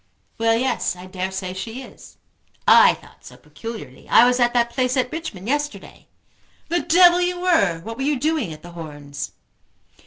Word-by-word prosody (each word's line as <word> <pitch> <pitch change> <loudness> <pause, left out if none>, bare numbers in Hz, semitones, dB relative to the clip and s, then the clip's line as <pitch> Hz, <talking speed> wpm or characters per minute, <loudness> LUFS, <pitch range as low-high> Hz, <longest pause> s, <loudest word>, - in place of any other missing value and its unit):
"Well, 225 0 +3
yes; 245 -4 0
I 180 +1 -11
dare 185 0 -4
say 190 -1 -5
she 225 +7 -6
is." - - -15 0.5
"I - - +7
thought - - -19
so, - - -13
peculiarly. 225 - -10
I 235 - +7
was 250 +1 +2
at 240 -1 +3
that 235 0 +2
place 255 +1 0
at 250 -1 0
Richmond 270 - -6
yesterday." 290 +2 -4 0.6
"The 345 +1 +1
devil 350 +1 +5
you 355 0 -1
were! 260 - +2
What 225 +5 -7
were - - -5
you 285 -1 0
doing 300 - -1
at 155 0 -11
The 175 - -10
Horns?" 145 -4 -8
235 Hz, 180 wpm, -22 LUFS, 185-295 Hz, 0.6 s, I